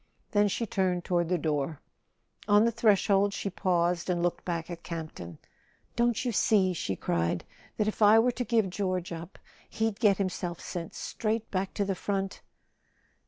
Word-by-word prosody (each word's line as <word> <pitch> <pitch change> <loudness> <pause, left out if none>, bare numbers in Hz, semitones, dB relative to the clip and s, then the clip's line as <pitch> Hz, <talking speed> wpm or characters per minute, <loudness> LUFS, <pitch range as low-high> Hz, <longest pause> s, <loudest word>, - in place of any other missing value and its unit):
Then 205 -1 +4
she 230 +4 -1
turned 185 -4 0
toward 175 -2 +1
the 180 - +2
door. 150 -1 -1 0.7
On 205 +1 +5
the 235 - +3
threshold 205 -3 +3
she 200 - -3
paused 175 -2 0
and 175 -1 0
looked 175 - -1
back 170 -1 -3
at 170 -1 -7
Camp 165 -2 -6
ton. 85 -2 -9 0.6
"Don't 240 +1 +1
you 245 - +1
see," 195 -3 +3
she 95 - -2
cried, 85 -1 -1 0.3
"that 210 - +1
if 215 - -3
I 210 +1 +7
were 240 +2 +4
to 245 - -3
give 225 -5 +1
George 185 -2 -2
up 170 +2 -7 0.3
he'd 220 -1 -1
get 210 -4 +4
himself 180 -3 -3
sent 170 -2 -6
straight 220 0 -3
back 190 0 -2
to 200 - 0
the 195 - 0
front 195 0 -3
190 Hz, 175 wpm, -29 LUFS, 175-210 Hz, 0.7 s, I